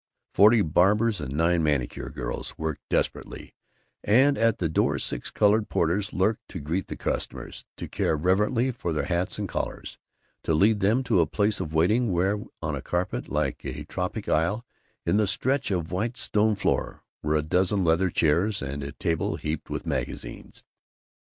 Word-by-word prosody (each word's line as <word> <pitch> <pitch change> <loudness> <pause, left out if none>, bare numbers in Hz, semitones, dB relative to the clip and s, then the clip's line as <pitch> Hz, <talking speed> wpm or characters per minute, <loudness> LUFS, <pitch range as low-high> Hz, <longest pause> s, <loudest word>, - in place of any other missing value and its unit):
Forty 105 +1 +6
barbers 100 +5 +3
and 65 - -5
nine 85 +2 +2
manicure 75 -6 -1
girls - - -4
worked 80 -2 -3
desperately, - - -2 0.5
and 135 +7 +4
at 115 -1 +2
the 85 - 0
door 80 - +1
six - - -2
colored 105 +1 +2
porters 95 +5 0
lurked 105 +4 0
to 90 - -7
greet 80 +6 -2
the - - -5
customers, - - -4
to - - -6
care 80 - 0
reverently 105 - +2
for 85 -8 -3
their 75 - -1
hats 90 0 -1
and - - -3
collars, - - -5 0.4
to 80 - +1
lead 105 +6 +4
them 110 +7 +2
to 105 - +2
a 80 - +2
place 105 +4 0
of 80 0 -4
waiting 105 +8 +3
where, 95 +4 +1 0.2
on - - -1
a - - -5
carpet 90 +1 -2
like - - -1
a 70 +3 -5
tropic 95 +6 -4
isle 100 +10 +1 0.4
in - - +2
the 105 -1 +2
stretch 130 +6 0
of 90 -5 -2
white 115 +6 -2
stone 105 -1 +2
floor, 100 - -1 0.2
were 75 +1 0
a 75 - +1
dozen 95 +4 +1
leather 85 +3 +3
chairs 90 +7 +2
and 70 +1 -4
a 70 0 -6
table 80 -1 -1
heaped 75 0 -4
with - - -4
magazines. - - -5
95 Hz, 175 wpm, -26 LUFS, 80-105 Hz, 0.5 s, Forty